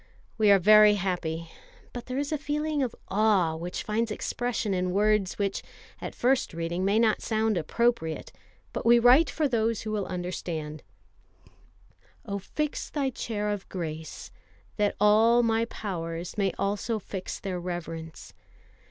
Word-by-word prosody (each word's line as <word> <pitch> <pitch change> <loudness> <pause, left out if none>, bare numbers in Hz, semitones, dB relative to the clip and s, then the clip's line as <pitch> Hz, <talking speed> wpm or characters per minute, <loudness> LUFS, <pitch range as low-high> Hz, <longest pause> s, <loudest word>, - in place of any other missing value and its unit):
We 215 -2 +3
are 200 - +8
very 210 +2 +7
happy; 170 -4 -3 0.4
but 245 - -7
there 255 0 -3
is 285 +1 -2
a 305 - +1
feeling 300 0 -1
of 250 -4 -2
awe 195 -5 +3
which 175 +2 -5
finds 225 +2 -1
expression 230 0 -2
in 180 0 0
words 210 -1 +2
which, 200 -1 -1 0.4
at - - -6
first 255 -7 +1
reading, 170 +2 -2
may 200 +3 +2
not 225 -2 +3
sound 220 -1 0
appropriate; 175 0 0 0.4
but - - -3
we 235 +1 +6
write 250 +7 +6
for 310 -2 0
those 230 -3 0
who 215 - -4
will 210 -2 -2
understand: 170 -4 -4 1.4
Oh, 200 0 -3
fix 300 +9 -3
Thy 275 -3 -1
chair 210 -3 -3
of 205 -2 -5
grace, 160 -3 -6 0.5
that 210 -1 +1
all 220 +3 +5
my 225 0 +2
powers 170 -6 -5
May 200 -3 +1
also 205 +3 -1
fix 190 -2 -6
their 185 -3 -4
reverence 165 -2 -6
210 Hz, 150 wpm, -27 LUFS, 180-230 Hz, 1.4 s, are